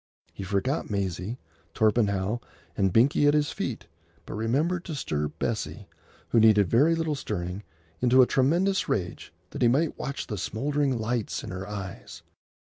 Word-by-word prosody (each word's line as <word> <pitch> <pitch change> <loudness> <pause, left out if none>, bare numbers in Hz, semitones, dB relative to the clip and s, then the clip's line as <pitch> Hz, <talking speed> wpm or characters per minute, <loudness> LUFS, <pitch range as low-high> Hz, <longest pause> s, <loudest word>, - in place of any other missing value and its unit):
He - - -8
forgot 100 +9 -1
Maisie, 100 +2 -2 0.4
Torpenhow, 105 -1 +2 0.4
and 95 -1 +2
Binkie 135 +7 +4
at 145 - +4
his 150 -1 +1
feet, - - -4 0.4
but - - -7
remembered 145 +11 0
to 160 - -5
stir 75 - -2
Bessie, - - -4 0.4
who 115 - +4
needed 105 -3 +6
very 150 +8 +5
little 165 -2 -1
stirring, 95 -8 -4 0.4
into 130 +1 +6
a - - +5
tremendous 170 +11 +2
rage, 90 -6 -2 0.2
that - - -6
he 120 - +5
might 145 +7 +1
watch 140 - -4
the 105 -4 -5
smouldering 140 +6 0
lights 115 0 -2
in - - -6
her 95 +1 -5
eyes. 95 -3 -7
115 Hz, 155 wpm, -27 LUFS, 100-145 Hz, 0.4 s, needed